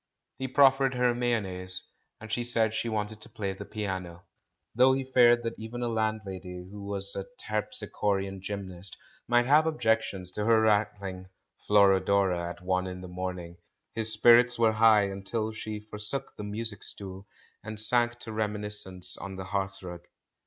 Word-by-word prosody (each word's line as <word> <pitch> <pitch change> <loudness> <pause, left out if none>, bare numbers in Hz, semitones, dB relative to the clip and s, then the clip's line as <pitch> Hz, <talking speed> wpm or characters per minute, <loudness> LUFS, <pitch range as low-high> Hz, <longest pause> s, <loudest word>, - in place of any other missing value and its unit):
He 130 - -2
proffered 135 0 +4
her 125 -1 +3
mayonnaise, 95 -7 -2 0.4
and 110 0 -10
she 120 - 0
said 115 -2 +1
she 115 - -2
wanted 105 0 -3
to - - -11
play 100 -2 -3
the 95 - -9
piano. 95 -5 -5 0.5
Though 130 +2 +5
he 135 0 -1
feared 120 -2 +5
that 115 0 -2
even 115 +2 -5
a - - 0
landlady 95 -5 -3
who 100 -1 -8
was 100 -1 -1
a - - -4
terpsichorean 100 - -2
gym 100 0 -5
nast 90 0 -8 0.3
might 120 0 +4
have 150 +4 +5
objections 110 - 0
to 105 - -3
her 115 -1 +5
rattling 105 -3 0 0.4
"Flor 100 -2 +6
odora" 95 -3 +1
at 90 - -9
one 95 0 0
in 90 0 -6
the 90 - -8
morning, 90 -1 -5 0.4
his 115 -1 +2
spirits 120 +2 +6
were 115 -1 +4
high 110 -1 +6
until 100 +3 -3
she 110 -1 -6
forsook 105 +6 -3
the 105 - -7
music 105 0 0
stool 95 0 -5 0.4
and 110 +1 -6
sank 120 +2 +2
to 115 - -6
reminiscence 105 -4 -1
on 100 -1 -7
the 95 0 -6
hearthrug. 95 -3 -4
105 Hz, 165 wpm, -28 LUFS, 95-115 Hz, 0.5 s, Flor